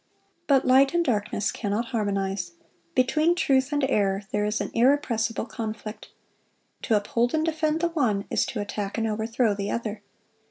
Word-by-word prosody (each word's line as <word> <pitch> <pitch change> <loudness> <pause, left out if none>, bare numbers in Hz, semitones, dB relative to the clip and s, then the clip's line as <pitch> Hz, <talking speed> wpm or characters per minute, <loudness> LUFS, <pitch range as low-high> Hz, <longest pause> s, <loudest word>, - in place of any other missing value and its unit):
But 275 -2 +4
light 270 +4 +5
and 340 0 +2
darkness 205 -4 0
cannot 220 +2 -2
harmonize. 195 -4 -1 0.4
Between 305 +7 +3
truth 270 -4 +2
and 290 -1 0
error 200 -6 +1
there 210 0 0
is 210 +1 -1
an - - -3
irrepressible 235 -3 +1
conflict. 215 -2 -6 0.7
To 225 - +1
uphold 230 +6 0
and 315 0 +1
defend 315 0 0
the 345 - +2
one 240 -12 0
is - - +1
to 225 - -4
attack 205 0 -4
and 225 - 0
overthrow 220 +1 0
the 200 0 -3
other. 220 -3 -3
225 Hz, 160 wpm, -26 LUFS, 205-270 Hz, 0.7 s, light